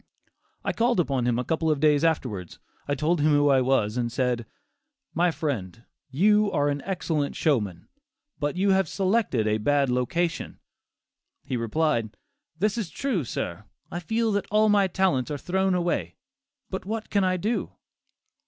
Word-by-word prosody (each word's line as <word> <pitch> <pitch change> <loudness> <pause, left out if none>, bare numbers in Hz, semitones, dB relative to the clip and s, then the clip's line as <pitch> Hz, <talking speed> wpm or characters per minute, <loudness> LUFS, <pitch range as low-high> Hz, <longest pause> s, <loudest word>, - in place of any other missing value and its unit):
I - - 0
called 235 -3 +2
upon 135 -7 +1
him 120 -1 +1
a 125 - 0
couple 160 +4 0
of 150 -2 +1
days 150 0 +3
afterwards; 120 - -1 0.4
told 155 +3 +1
him 150 - +3
who 145 0 +4
I 135 -2 +4
was, 125 -4 +1
and 120 -1 -1
said: 125 -2 -1 0.7
"My 175 +1 +3
friend, 115 - -4 0.3
you 210 +9 +3
are 145 0 +1
an 145 0 -2
excellent 160 -6 -1
showman, 105 - 0 0.5
but 145 +2 -1
you 195 +1 +3
have 190 -4 +2
selected 190 - +1
a 110 0 +1
bad 140 +3 +2
location." 160 +8 -1 0.9
He 130 - -3
replied, 115 -2 0 0.4
"This 210 +5 0
is 200 -7 -3
true, 240 - -1
sir; 105 -4 -4 0.3
I 175 - -3
feel 225 +5 0
that 205 -1 -1
all 215 +1 +4
my 200 -2 +4
talents 185 -9 +1
are 145 - -2
thrown 190 +4 0
away; 170 - -1 0.6
but - - -4
what 220 +2 -5
can 200 -2 +2
I 185 0 +1
do?" 215 +7 -2
155 Hz, 160 wpm, -26 LUFS, 125-190 Hz, 0.9 s, who